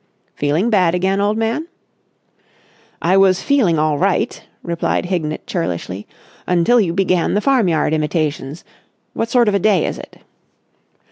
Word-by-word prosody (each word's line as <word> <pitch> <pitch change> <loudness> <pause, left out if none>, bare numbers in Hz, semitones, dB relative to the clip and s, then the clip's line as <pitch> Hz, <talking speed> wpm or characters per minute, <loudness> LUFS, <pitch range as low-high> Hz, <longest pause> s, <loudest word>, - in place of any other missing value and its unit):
"Feeling 155 +11 0
bad 180 -5 +3
again, 190 +2 0
old 205 +2 0
man?" 230 +9 -2 1.4
"I 185 +3 +3
was 195 -1 +3
feeling 235 - +2
all 155 -1 +1
right," 195 0 0 0.2
replied 170 +1 -1
Hignett 160 -4 -3
churlishly, 90 +3 -4 0.4
"until 180 +7 +3
you 180 -5 0
began 185 -1 +1
the - - +3
farmyard 200 - +1
imitations. 155 -1 -2 0.5
What 230 - -2
sort 240 -2 +3
of 210 - +2
a 200 - +2
day 195 -4 +2
is - - -4
it?" - - -12
180 Hz, 140 wpm, -18 LUFS, 155-210 Hz, 1.4 s, bad